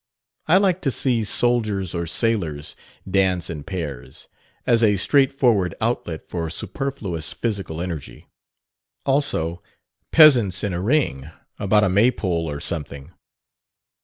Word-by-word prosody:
I 170 +4 +6
like 190 -2 +2
to 140 - 0
see 125 -3 0
soldiers 105 -4 0
or 85 -1 -3
sailors 85 -8 -1 0.3
dance 95 -3 +1
in 75 -3 -6
pairs, 75 -9 -7 0.4
as 120 -2 +3
a 105 -3 +4
straightforward 125 -5 +2
outlet 110 -8 -2
for 85 -2 -4
superfluous 95 - -3
physical 100 -8 -4
energy. 85 -5 -6 0.8
Also, 90 - 0 0.5
peasants 120 - +6
in 100 -3 -1
a 85 - -2
ring 100 - 0 0.3
about 105 +1 +3
a 95 - +3
Maypole 95 -5 +1
or 70 -1 -5
something. 70 -1 -6
95 Hz, 120 wpm, -22 LUFS, 85-120 Hz, 0.8 s, I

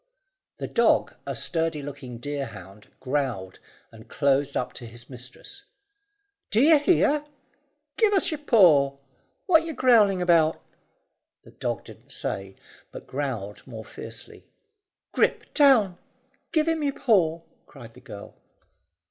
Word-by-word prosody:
The - - -5
dog, - - +2
a - - -3
sturdy 165 -3 -1
looking 130 -4 -8
deerhound, 115 -7 -7
growled, 130 -9 -3 0.3
and 110 -1 -15
closed 140 0 +1
up 125 - -3
to 120 - -9
his 120 +3 -11
mistress. 125 - -9 0.9
"D'ye 290 +9 +5
hear? 295 -1 +2 0.7
Give's 415 -6 +3
your 310 - -4
paw. 160 - +4 0.5
What 340 -5 +5
yer 325 -1 -5
growling 220 -8 +4
about?" 165 -3 +3 0.8
The - - -16
dog - - -4
didn't - - -15
say, 95 0 -5 0.4
but - - -10
growled 125 -8 -5
more 110 -3 -9
fiercely. - - -10 0.7
"Grip, - - 0
down! 230 - +4 0.5
Give 315 -1 +1
him 325 -1 0
your 285 -2 0
paw," 170 -8 +2 0.2
cried 115 -5 -13
the 125 - -16
girl. 110 -6 -10
145 Hz, 125 wpm, -25 LUFS, -, 0.9 s, D'ye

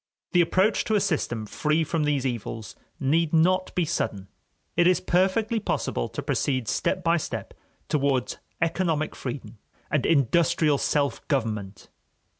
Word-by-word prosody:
The 175 - +5
approach 190 +5 +2
to 220 - +1
a - - +4
system 120 - -1
free 150 +8 0
from 160 0 -1
these 145 -3 0
evils 115 -3 -4 0.2
need 160 +3 +1
not 185 +3 +3
be 180 - +2
sudden; 100 -9 -2 0.5
it 175 0 +4
is 185 - +4
perfectly 195 +5 +1
possible - - -2
to - - -5
proceed 130 -5 0
step 185 - 0
by 170 0 +3
step 160 - -5 0.3
towards 140 -4 0 0.2
economic 165 -2 0
freedom 125 -3 -6 0.3
and 150 - +2
industrial 155 +1 +3
self 145 -1 0
government. 110 -8 -2
155 Hz, 140 wpm, -26 LUFS, 130-175 Hz, 0.5 s, The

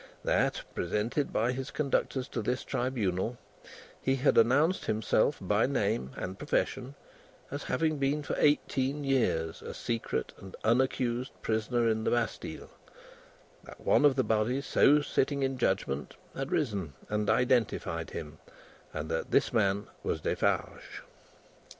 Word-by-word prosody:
That, - - +1
presented 105 - -1
by 115 +3 +1
his 130 +1 -4
conductors 135 -2 -1
to - - -3
this 125 +4 -1
Tribunal, 115 -3 -1 0.6
he 135 - +2
had 130 - +2
announced 145 +10 +4
himself 110 0 +2
by - - +2
name 65 +1 0
and 95 +1 -5
profession 135 +3 -1 0.6
as 145 +1 -5
having 155 -2 0
been 140 +2 +1
for - - -3
eighteen 145 -1 +2
years 115 -12 0
a - - -7
secret 115 -1 -2
and 95 -1 -10
unaccused 125 +1 +1
prisoner 115 +2 +1
in 110 -1 +1
the - - +1
Bastille; 120 -1 -2 0.9
that, - - -12
one - - +3
of 145 -2 +6
the 130 - +2
body 110 +4 +1
so 145 +1 +4
sitting 140 0 0
in 135 -1 -1
judgment 95 - -1 0.2
had 135 +1 -4
risen 100 - -1
and 105 -1 -1
identified 125 -2 +1
him, 75 -1 -7 0.6
and 80 0 -3
that 80 - -2
this - - +2
man 100 -2 +2 0.2
was - - -2
Defarge. - - -1
120 Hz, 140 wpm, -30 LUFS, 105-135 Hz, 0.9 s, of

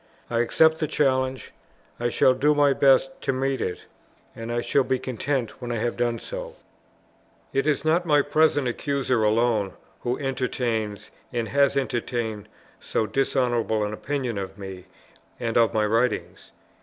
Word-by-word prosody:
I 115 - +1
accept 160 +7 +4
the 155 - 0
challenge; 130 -3 0 0.5
I 120 0 0
shall 130 - +4
do 145 +4 +2
my 145 -1 +4
best 135 -1 +4
to 135 - 0
meet 135 0 -1
it, 90 - -4 0.5
and 115 +1 -6
I 120 0 0
shall 140 +3 +2
be 130 - 0
content 130 0 -3
when 120 -1 -4
I - - -1
have 115 +1 -1
done 120 -1 0
so. - - -7 1.0
It 135 +2 +1
is 150 0 +1
not 165 +3 +3
my 150 -4 +3
present 145 -2 +2
accuser 130 -2 0
alone 110 -2 +2 0.3
who 125 +1 -2
entertains, 120 -6 -2 0.2
and 120 -2 -2
has 140 0 +3
entertained, 115 -5 -2 0.3
so 110 - -1
dishonourable 120 -2 0
an 105 0 -2
opinion 125 -2 -3
of 95 0 -6
me 95 -2 -8 0.5
and 115 -1 -2
of 115 -1 +4
my 110 -1 +1
writings. 115 +2 -1
125 Hz, 155 wpm, -25 LUFS, 115-140 Hz, 1.0 s, accept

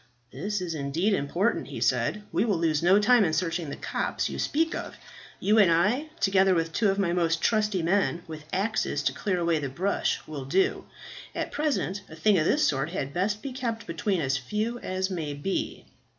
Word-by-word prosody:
"This 205 -1 -3
is 175 -2 -3
indeed 160 +8 0
important," 185 +6 0
he - - -6
said. 210 - +1
"We - - +2
will 210 -6 +1
lose 160 -2 +1
no 180 +3 +5
time 225 +2 +5
in 160 -5 +1
searching 165 -1 -1
the - - -5
copse - - -2
you - - -5
speak 325 +3 +1
of. - - -5 0.4
You 215 +2 +3
and 190 -5 +6
I, 215 - +2
together 195 -1 +4
with 165 -1 -1
two 210 +3 +2
of 195 - 0
my 185 -4 +1
most 165 -2 +1
trusty 210 -3 +1
men, 175 -1 +1
with 155 -2 -8
axes 210 +4 0
to - - +1
clear 195 -4 -1
away 170 -2 +1
the 140 -2 -3
brush, 185 +9 0
will 145 -4 -6
do. 185 +8 +1 0.5
At - - -3
present 280 -10 -1
a 160 - -10
thing 195 +3 +3
of 155 - +1
this 300 - +3
sort 135 +2 0
had 140 -6 -4
best 205 +4 -1
be 275 - -4
kept 235 -3 -3
between 205 -7 -1
as 135 -2 +1
few 215 - -3
as 185 -1 -2
may 155 -5 -3
be." 165 +7 -3
185 Hz, 205 wpm, -27 LUFS, 165-210 Hz, 0.5 s, and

